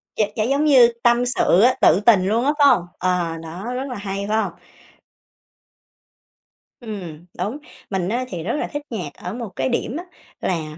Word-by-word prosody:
Gi 215 - +2
gi 215 -1 0
giống 285 +2 +2
như 255 -5 +7
tâm 240 0 +4
sự 220 -6 +3
á, 250 +3 +6
tự 185 - +5
tình 205 -4 +4
luôn 230 +5 +1
á, 290 - +4
phải 285 - +7
hông? 210 -10 +4
Ờ, 175 -3 0
đó, 175 +9 -6
rất 265 +2 -3
là 250 - -5
hay, 200 0 -4
phải 215 - +2
hông? 185 - -4 2.3
Ừm, 180 -9 -8
đúng, 210 +10 -2 0.3
mình 190 -2 -1
á 245 +3 -1
thì 170 -3 -5
rất 220 - -2
là - - -2
thích 290 - -3
nhạc 180 -11 -5
ở 180 - -7
một 235 -3 -5
cái 130 0 -1
điểm 245 - -2
á 345 - -5 0.4
là 155 -3 -3
210 Hz, 195 wpm, -21 LUFS, 180-245 Hz, 2.3 s, như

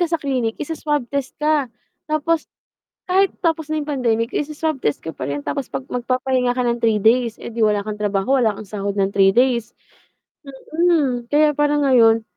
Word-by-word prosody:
ka 350 - +3
sa 335 - +1
clinic, 255 -6 -2
isa-swab 295 -3 -2
test 275 -2 -3
ka. 300 -4 +1 0.4
Tapos 310 +1 0 0.6
kahit 385 +2 +3
tapos 320 -3 -1
na 310 - 0
'yong 290 - -7
pandemic 230 -5 0
isa-swab 305 -1 -2
test 145 - 0
ka 160 -2 -8
pa - - -5
rin, 140 +2 -3
tapos 270 - -4
'pag 265 - -5
magpapahinga 255 0 0
ka 250 - -2
ng 240 -1 +1
3 225 -3 +1
days, 230 +2 +2
eh, - - -7
'di 230 -1 0
wala 210 -1 +2
kang 210 +1 -5
trabaho, 210 +5 0
wala 230 -5 +2
kang 205 0 -10
sahod 200 -1 -3
ng 195 - +2
3 195 -1 +5
days 240 -1 +1 1.0
mm. 295 -9 +2
Kaya 300 0 +4
parang 295 0 +2
ngayon, 225 -3 +5
250 Hz, 190 wpm, -20 LUFS, 225-295 Hz, 1.0 s, 3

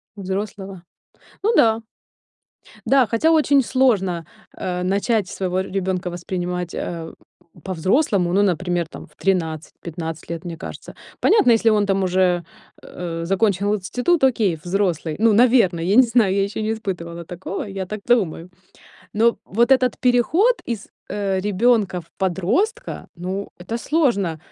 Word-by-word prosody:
Взрослого? 195 -1 -5 0.6
Ну 445 +3 +3
да. 225 - +4 1.0
Да, 265 0 +4
хотя 235 +9 +2
очень 290 -3 +4
сложно, 200 -10 +1 0.3
э, 180 -1 -3
начать 200 +2 +1
своего 185 -1 -2
ребёнка 190 -1 -2
воспринимать, 175 0 -4
э, 165 -2 -5 0.5
по-взрослому, 190 - +1
ну 200 +2 +4
например 175 -2 0
там - - -10
в - - -27
13, 165 -5 -1
15 165 -1 -6
лет, 170 +1 -6
мне 170 -1 -5
кажется. - - -9 0.3
Понятно, 420 - +4
если 225 0 +4
он 210 -1 +2
там 195 -1 +1
уже, 180 -1 +2 0.4
э, 165 -1 -6
закончил 200 +2 +1
институт- 250 - 0
окей, 220 -9 +3
взрослый. 175 -4 -1
Ну, 225 0 +4
наверное, 225 -7 +4
я 190 +4 +1
не 260 - +8
знаю, 225 -5 +2
я 195 - +2
ещё 200 +2 -4
не 220 +1 0
испытывала 170 -6 -5
такого, 180 +3 -5
я 195 -1 -5
так 210 +2 -6
думаю. 185 -8 +1 0.7
Но 230 +2 +3
вот 235 +5 +1
этот 255 -1 +3
переход 260 - +3
из, 225 -4 -4 0.2
э, 195 -2 -1
ребёнка 210 -2 +2
в 165 - -19
подростка, 205 - -1
ну, 185 +3 -4 0.2
это 230 - -2
сложно. 235 - +1
195 Hz, 140 wpm, -21 LUFS, 180-230 Hz, 1.0 s, не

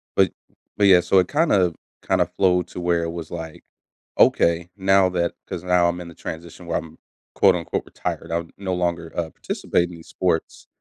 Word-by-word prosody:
but 95 -3 +4 0.5
but 100 - +4
yeah, 90 -2 +7
so, 95 - +4
it 90 - +2
kinda 125 - +2 0.3
kinda - - +3
flowed 90 -2 +1
to - - -7
where 85 -1 +1
it 85 - -3
was, 85 -1 -7
like, 80 -2 -7 0.6
okay, 85 +1 +4
now 95 0 +4
that 85 -1 -1
'cause 85 - -5
now 90 -1 +3
I'm 90 +1 -4
in 85 - -8
the 85 - -12
transition 85 +2 -8
where 85 - -1
I'm, 80 0 -11 0.4
quote, 95 -2 +5
unquote 85 -1 -3
"retired," - - -5
I 85 0 0
no 95 -2 -3
longer, 85 -2 -2
uh, 85 -2 -2
participate 85 0 -1
in 90 - -9
these 80 -1 -14
sports, 90 -3 -2
85 Hz, 195 wpm, -23 LUFS, 85-90 Hz, 0.6 s, yeah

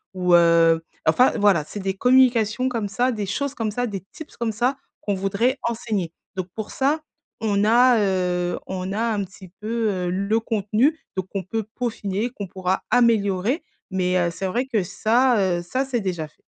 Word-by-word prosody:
ou, 180 -1 +1
heu, 165 -1 +5 0.2
enfin 255 - +5
voilà, 200 -7 +4
c'est 155 +7 -8
des 190 -1 -1
communications 250 +1 +3
comme 230 -4 -2
ça, 245 +5 +1
des 210 -4 -3
choses 275 +8 -2
comme 225 -6 -2
ça, 245 +4 -1
des 200 -4 -5
tips 315 - -11
comme 235 -2 -1
ça, 245 +5 0 0.2
qu'on 205 - -1
voudrait 200 +7 0
enseigner, 220 -7 -2 0.2
donc 185 -1 -3
pour 220 -1 -5
ça, 290 +4 +1 0.4
on 205 -2 +1
a, 240 +2 +5
heu, 180 -3 0
on 185 0 -4
a 215 - -1
un 205 -2 0
petit 190 0 -12
peu, 225 +1 -1
heu, 180 -2 -2
le 200 +5 +1
contenu, 225 +7 +1 0.2
donc 190 -1 -3
on 195 - -1
peut 220 +5 -3
peaufiner, 225 -2 -2
qu'on 205 -5 -6
pourra 185 +1 -2
améliorer 230 - +2 0.3
mais 180 -1 +1
heu, 175 -1 +1
c'est 190 +3 -4
vrai 240 +8 -1
que 235 -6 0
ça, 215 -1 +2
heu, - - -5
ça 255 +10 -2
s'est 260 -3 -1
déjà 175 -5 -3
fait. 150 - -30
205 Hz, 190 wpm, -23 LUFS, 185-240 Hz, 0.4 s, heu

